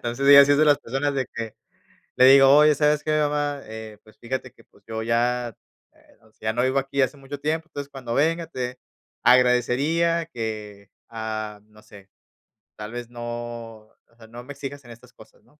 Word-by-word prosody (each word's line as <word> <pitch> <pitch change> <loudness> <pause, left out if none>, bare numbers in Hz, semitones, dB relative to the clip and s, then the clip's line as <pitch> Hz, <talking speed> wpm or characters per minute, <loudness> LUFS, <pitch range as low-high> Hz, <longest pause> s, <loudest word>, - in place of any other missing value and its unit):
entonces, 120 +3 -3
ella 140 0 +10
sí 145 - +4
es 145 - +2
de 155 - +5
las 145 -2 +5
personas 135 +4 -2
de 130 -2 -1
que 115 -2 -6 0.6
le 130 - +6
digo: 135 +1 +8
"Oye, 150 0 +6
¿sabes 150 0 +1
qué 155 0 0
mamá? 145 -1 -1
Eh, 110 -1 -9
pues 110 - -21
fíjate 130 +2 -5
que - - -21
pues - - -27
yo 110 0 -4
ya, 120 0 -1 0.4
eh, - - -26
o 110 0 -25
sea, 110 0 -5
ya - - 0
no 120 - 0
vivo 130 +2 +1
aquí 135 0 -1
hace 135 +2 0
mucho 140 +1 -9
tiempo. 160 +3 -2
Entonces, 140 -1 -7
cuando 130 -4 -6
venga, 165 +5 +1
te 125 -4 -5 0.4
agradecería 135 +7 +3
que, 105 - -7 0.2
ah, 110 -2 -5
no 105 0 -20
sé, 100 -2 -17 0.7
tal 105 +1 -7
vez 120 -1 -7
no, 120 -1 -9 0.6
o 110 +1 -32
sea, 115 - -15
no 120 +2 -11
me 145 +3 -9
exijas 140 0 -8
en - - -15
estas 125 +2 -16
cosas, - - -19
¿no?, 150 - -29
125 Hz, 205 wpm, -23 LUFS, 115-145 Hz, 0.7 s, ella